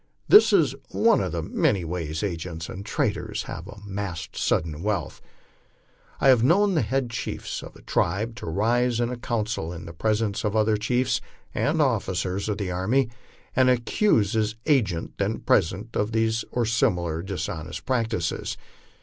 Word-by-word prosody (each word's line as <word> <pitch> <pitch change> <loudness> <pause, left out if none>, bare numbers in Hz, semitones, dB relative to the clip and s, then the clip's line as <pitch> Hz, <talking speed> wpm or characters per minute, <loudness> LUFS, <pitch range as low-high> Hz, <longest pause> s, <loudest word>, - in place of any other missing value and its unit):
This 415 - +8
is - - +4 0.2
one 230 -2 +3
of 90 - -2
the 85 -1 -2
many 90 +2 +1
ways 80 -1 -3
agents 85 -3 -4
and 95 - -6
traders - - -1
have 85 - -7
of 100 0 -11
amassing 95 -5 -4
sudden 80 -1 0
wealth. 105 0 -2 1.0
I 135 - +5
havo 125 -3 +6
known 190 - +4
the 160 - +2
head 130 -3 -1
chiefs 115 - -4
of - - -11
a - - -16
tribe 105 +7 0
to 125 - -7
rise 115 +7 +1
in 120 0 0
a - - -2
council 110 -7 -2
in 85 -1 -7
the 85 - -8
presence 105 +3 0
of 105 0 -1
other 110 0 +3
chiefs 120 +3 +1 0.3
and - - +1
of - - +5
officers 95 +3 0
of 105 - -1
the 100 -4 -3
army, 115 +8 +1 0.4
and 130 -1 +5
accuse 120 - +2
his 110 -1 0
agent, 105 - +1
then 100 +3 0
present, 100 +5 +1
of 105 +2 0
these 110 0 +1
or 120 -1 0
similar 90 -9 +1
dishonest 85 -3 -5
practices. 115 -9 -1
105 Hz, 165 wpm, -25 LUFS, 90-120 Hz, 1.0 s, This